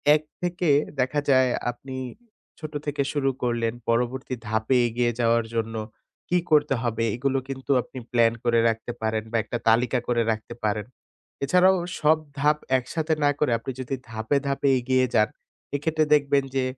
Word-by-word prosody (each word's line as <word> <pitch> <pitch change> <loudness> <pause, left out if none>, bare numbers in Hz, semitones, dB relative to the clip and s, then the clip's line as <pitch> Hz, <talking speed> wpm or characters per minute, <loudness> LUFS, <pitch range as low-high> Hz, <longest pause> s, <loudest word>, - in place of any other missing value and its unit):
এক 155 - 0 0.2
থেকে 175 -1 -1 0.3
দেখা 130 +3 +1
যায় 130 -1 +5 0.2
আপনি 130 +2 -10 0.6
ছোট 155 -1 -7
থেকে 145 -1 -1
শুরু 140 -2 +1
করলেন, 120 -2 0 0.2
পরবর্তী 125 +2 0
ধাপে 110 +4 +1
এগিয়ে 120 +1 0
যাওয়ার 115 -1 +3
জন্য 115 0 -2 0.5
কী 180 - +3
করতে 150 -2 +4
হবে 115 -1 -1
এগুলো 135 +2 0
কিন্তু 135 +1 -4
আপনি 130 - -13
প্লান 115 -1 +4
করে 120 -1 +3
রাখতে 115 +1 -3
পারেন 110 -1 -1
বা 115 - +1
একটা 120 - -4
তালিকা 125 +3 +3
করে 120 -1 +2
রাখতে 110 +2 -5
পারেন। 105 -1 0 0.6
এছাড়াও 180 +6 +5 0.2
সব 155 +1 +4 0.2
ধাপ 150 +2 +3 0.2
একসাথে 155 +5 -2
না 145 - +5
করে 150 - +2
আপনি 125 - -5
যদি 130 +2 -3 0.2
ধাপে, 110 +5 0
ধাপে 140 0 0
এগিয়ে 130 +1 +2
যান 105 0 +4 0.5
এক্ষেত্রে 155 +2 +1
দেখবেন 140 -1 +3
যে, 135 - +2
130 Hz, 160 wpm, -25 LUFS, 115-145 Hz, 0.6 s, যায়